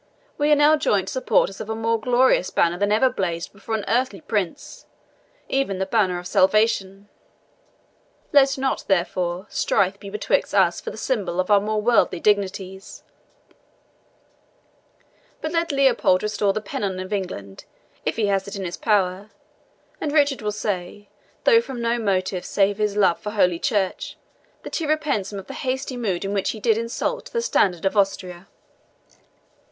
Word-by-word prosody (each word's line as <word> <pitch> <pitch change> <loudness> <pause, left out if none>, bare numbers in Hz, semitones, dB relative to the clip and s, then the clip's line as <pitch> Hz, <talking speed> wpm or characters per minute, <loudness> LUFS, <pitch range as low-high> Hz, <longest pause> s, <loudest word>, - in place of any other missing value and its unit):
We 295 +1 +1
are - - +7
now 295 +2 +5
joint 195 -9 +1
supporters 195 -4 +1
of 215 - -7
a 220 - -2
more 225 0 0
glorious 250 -5 +3
banner 170 +1 +1
than 205 0 +1
ever 220 +5 +4
blazed 175 -9 -3
before 215 +3 -4
an 215 - -3
earthly 240 -4 0
prince, 205 - -4 0.6
even 270 -8 0
the 190 - -1
Banner 190 -3 +1
of 175 - -8
Salvation. 195 +1 +2 1.3
Let 275 -1 +5
not, 265 0 -1
therefore, 180 -1 0
strife 195 +1 +1
be 200 - -9
betwixt 210 +1 -1
us - - +3
for - - -5
the - - -9
symbol 190 -9 -2
of 185 +3 0
our 200 -1 +6
more 215 +1 -1
worldly 230 -6 +3
dignities; 195 -2 -1 2.4
but 315 - -4
let 335 -1 0
Leopold 260 -9 +3
restore 210 -1 +1
the 215 - -3
pennon 195 -3 -3
of 185 +2 -5
England, 100 - -5 0.4
if - - -1
he 225 - +1
has 195 -1 0
it 200 - -6
in 195 -1 -4
his 175 - -5
power, 200 -1 0 0.7
and 300 - -1
Richard 285 -4 +2
will 210 -1 -1
say, 205 -1 -4 0.3
though 460 -1 +6
from 265 - -7
no 235 0 0
motive 190 -3 -1
save 200 +1 +1
his 210 -1 0
love 190 -4 +3
for 210 - -5
Holy 180 -5 +2
Church, 195 -1 -1 0.5
that - - -4
he 325 - -2
repents 290 -10 0
him 200 - -6
of 195 - -7
the - - -8
hasty 260 0 -3
mood 200 -7 -2
in 195 - -2
which 200 -2 0
he 220 - -4
did 225 0 +2
insult 240 - -3
the 470 - -1
standard 190 - +1
of 195 - +1
Austria." 190 -2 -1
205 Hz, 170 wpm, -23 LUFS, 190-240 Hz, 2.4 s, are